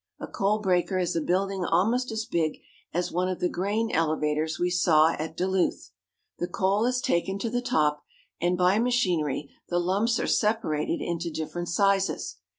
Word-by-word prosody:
A - - -5
coal 200 +2 0
breaker 185 -2 +1
is 180 -2 -1
a 165 - +1
building 190 +3 0
almost 225 +9 +1
as 220 0 -3
big 160 -2 -1 0.3
as 175 +2 -1
one 180 +2 0
of 185 - -3
the 180 - +1
grain 205 +6 -1
elevators 155 -1 0
we 180 0 0
saw 160 -3 +4
at 160 0 -5
Duluth. 185 0 0 0.5
The 175 - -1
coal 200 +6 +1
is 250 0 0
taken 190 +3 0
to 225 +3 -3
the 245 0 0
top, 150 -9 +1 0.4
and 175 +1 +1
by 180 +3 +3
machinery 180 - 0 0.2
the 175 - 0
lumps 200 +7 +1
are - - -1
separated 210 -9 0
into 170 0 -2
different 165 +2 -4
sizes. 195 +1 +1
180 Hz, 170 wpm, -27 LUFS, 165-205 Hz, 0.5 s, saw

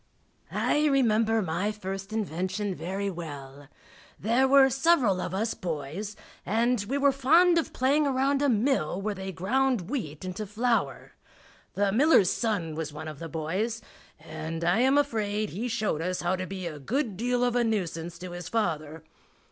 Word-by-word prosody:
I 300 +1 +1
remember 225 -5 +3
my 185 +5 -1
first 195 -1 -6
invention 200 -1 -2
very 195 +3 -3
well. 145 -5 -8 0.5
There 240 +5 +2
were 270 0 +6
several 265 - +3
of 180 - -3
us 220 +3 0
boys, 170 +5 -5 0.3
and 230 +1 +1
we 270 +7 -1
were 280 0 +4
fond 330 +6 +4
of 325 - -3
playing 285 +4 +2
around 275 +1 +1
a 285 - +3
mill 220 - +1
where 210 +1 -2
they 190 0 -6
ground 235 +3 0
wheat 170 - -4
into 190 +3 -5
flour. 230 +4 -1 0.6
The 200 -1 +2
miller's 240 - +5
son 200 -9 -1
was 155 -1 -4
one 155 +2 -7
of 155 -2 -8
the 165 - -6
boys, 185 +9 -2 0.4
and 160 +1 -6
I 175 +5 +3
am 265 +3 +4
afraid 215 -7 0
he 220 +7 -3
showed 215 -8 -1
us 180 +2 -2
how 175 +2 +1
to 185 0 -4
be 190 -2 -6
a 155 -3 -5
good 225 - -2
deal 245 +4 0
of 245 -1 +1
a 245 - +3
nuisance 175 -6 -2
to 180 +1 -8
his 175 0 -7
father. 160 -8 -2
205 Hz, 170 wpm, -27 LUFS, 175-245 Hz, 0.6 s, were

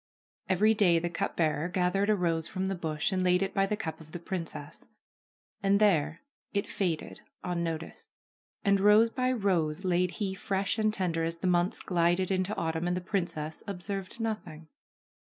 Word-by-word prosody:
Every 210 +4 +4
day 190 -6 +4
the 170 +1 -1
cup - - -2
bearer 155 0 +1
gathered 185 +3 +1
a 215 - +5
rose 165 -4 0
from 190 -2 -3
the 195 - 0
bush 160 -1 -1
and 185 -1 0
laid 180 +1 +3
it 195 - -3
by 195 -1 +2
the 210 - -1
cup 160 -6 -5
of 155 0 -15
the 175 - -4
princess; 165 -4 -6 0.7
and 200 0 +3
there 165 -7 +2 0.3
it 200 - 0
faded, 175 -5 -2 0.2
unnoticed. 170 -2 -4 0.6
And 200 0 +4
rose 210 +3 +6
by 255 0 0
rose 185 -7 0
laid 180 0 +2
he 200 -3 -1
fresh 195 +3 -1
and 215 0 +3
tender 175 -5 -1
as 165 +1 -2
the 165 - -6
months 180 0 +2
glided 175 +1 +1
into 185 +2 0
autumn, 160 +1 -1
and 180 0 0
the - - -3
princess 170 -5 -3
observed 195 +2 -5
nothing. 180 -9 -4
180 Hz, 175 wpm, -29 LUFS, 165-195 Hz, 0.7 s, rose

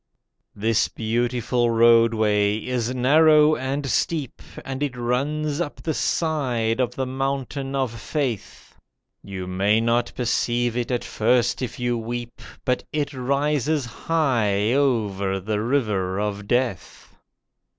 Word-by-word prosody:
This 110 +2 +1
beautiful 120 +1 0
Roadway 115 -3 +4
is 120 +1 -2
narrow 150 +4 +5
and 135 +2 -3
steep, 140 +3 -1 0.2
And 135 0 -5
it 140 -4 -2
runs 145 +6 -1
up 150 - -3
the 160 - -1
side 130 -10 0
of 125 -1 0
the 135 - -1
Mountain 135 +1 -3
of 120 -4 -2
Faith. 135 -9 -4 0.5
You 95 -2 -6
may 100 +4 +2
not 120 +1 +1
perceive 120 -1 0
it 120 -1 -2
at 125 -2 -1
first 120 +3 +1
if 125 - -5
you 120 -1 0
weep, 120 +1 -6 0.2
But 125 0 0
it 145 -1 -2
rises 140 +2 0
high 115 -6 0
over 105 -8 0
the 105 +2 -2
River 105 -7 0
of 105 -1 -3
Death. 120 -7 -2
120 Hz, 125 wpm, -23 LUFS, 110-135 Hz, 0.5 s, narrow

